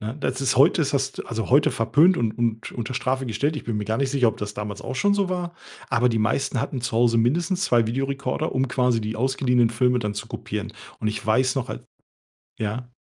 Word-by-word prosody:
Ne, 110 +5 -5
das 130 -2 -2
ist 135 -2 +1
heute 155 +6 +5
ist 145 -2 0
hast 135 -1 -2
also, 115 0 -4
heute 145 +3 +5
verpönt 150 +10 +4
und 115 -3 0
und 115 -1 -1
unter 120 +1 -4
Strafe 130 +1 -1
gestellt. 140 +8 -1
Ich - - -6
bin 115 -2 -2
mir 105 - -2
gar 110 +2 -1
nicht 135 -1 0
sicher, 130 -4 +3
ob - - -3
das 105 0 -5
damals 105 -1 -5
auch - - -5
schon 205 - +3
so 200 -2 +1
war. 175 -2 -3 0.4
Aber 125 -1 +3
die 115 -2 0
meisten 120 +4 0
hatten 125 +3 -2
zu 120 -1 -3
Hause 115 -1 +4
mindestens 170 - +1
2 120 -2 +3
Videorekorder, 135 +2 -2
um 130 +1 +1
quasi 125 -3 +1
die 110 +1 -3
ausgeliehenen 125 0 +2
Filme 125 +2 +2
dann 105 -2 -3
zu 105 - -5
kopieren. - - -5 0.3
Und 110 - 0
ich 110 0 -4
weiß 130 +4 +2
noch 130 - -2
al - - -6 0.7
ja? 110 +3 -3
125 Hz, 230 wpm, -24 LUFS, 115-135 Hz, 0.7 s, heute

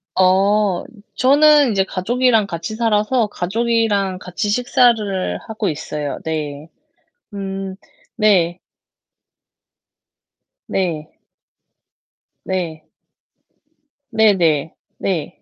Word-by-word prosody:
어 190 +1 +3 0.3
저는 290 0 +5
이제 195 -2 +2
가족이랑 230 +3 +1
같이 170 +3 -5
살아서 220 +1 +1
가족이랑 205 -1 0
같이 185 +4 -4
식사를 220 -4 +1
하고 220 -2 -3
있어요. 150 -1 -4
네. 155 -1 -4 0.6
음 195 -1 -5 0.4
네. 185 -5 +2 2.1
네. 165 -5 -2 1.3
네. 170 -4 -3 1.3
네네. 175 -9 +2 0.3
네. 180 -6 -3
195 Hz, 140 characters per minute, -19 LUFS, 175-220 Hz, 2.1 s, 저는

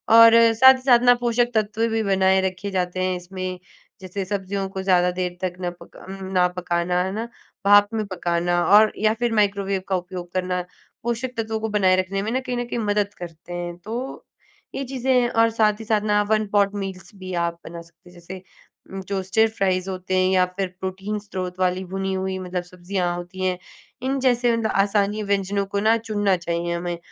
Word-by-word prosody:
और 230 0 +9 0.2
साथ 260 +3 +8
ही 260 - -7
साथ 250 -2 +5
ना, 245 0 +7
पोषक 240 0 0
तत्व 220 +1 +1
भी 225 0 0
बनाए 190 -1 +3
रखे 190 +1 -3
जाते 185 -1 -1
हैं 185 0 0
इसमें। 185 0 -6 0.4
जैसे 190 +1 -4
सब्ज़ियों 195 0 -3
को 190 0 -5
ज़्यादा 180 -2 +3
देर 180 0 -3
तक 185 -1 -2
ना 180 - -1
पका - - -15
अम, 190 0 -8
ना 180 -1 +4
पकाना, 180 0 0
है 190 - -3
ना? 215 +3 -3 0.4
भाप 205 0 +7
में 220 -1 -1
पकाना 175 -1 0
और 215 +1 +7
या 215 0 +2
फिर 240 -1 +1
माइक्रोवेव 200 -2 +1
का 190 - 0
उपयोग 180 -1 -6
करना, 180 -1 -1 0.4
पोषक 240 +2 -2
तत्वों 220 -1 -2
को 220 0 -3
बनाए 195 -3 +3
रखने 195 +1 -3
में 215 +3 -3
ना, 255 - +1
कहीं 250 -1 -4
न 245 - -2
कहीं 240 0 -4
मदद 205 -1 0
करते 170 0 -9
हैं। 175 0 -4
तो 215 +6 -7 0.8
ये 275 - -2
चीज़ें 265 0 -2
हैं। 245 -1 +3
और 230 -1 +3
साथ 210 -1 +3
ही 225 - -8
साथ 215 -1 +1
ना, 210 0 +2
वन 215 -1 +2
पॉट 200 -1 +3
मील्स 190 -3 -6
भी 185 -1 -8
आप 170 0 -6
बना 170 0 -8
सकते 170 +2 -20
हैं। - - -18
जैसे 180 +2 -9 0.5
उम, 195 - -4
टोस्टेड 200 +3 +1
फ्राइज़ 185 -2 0
होते 185 0 -2
हैं 185 0 +3
या 185 -1 +4
फिर 195 -1 0
प्रोटीन 195 +3 -4
स्रोत 185 -3 -6
वाली 185 0 0
भुनी 195 0 -2
हुई, 190 0 -2
मतलब 180 -1 -4
सब्ज़ियाँ 180 0 -3
होती 175 +2 -5
हैं। 185 -1 0 0.4
इन 270 +2 -1
जैसे, 245 -2 +2
मतलब 220 -1 -1
आसानी 205 +1 0
व्यंजनों 200 0 0
को 200 - +1
ना 225 - +5
चुनना 205 -3 +1
चाहिए 170 0 -1
हमें 175 0 -3
195 Hz, 205 wpm, -23 LUFS, 180-215 Hz, 0.8 s, और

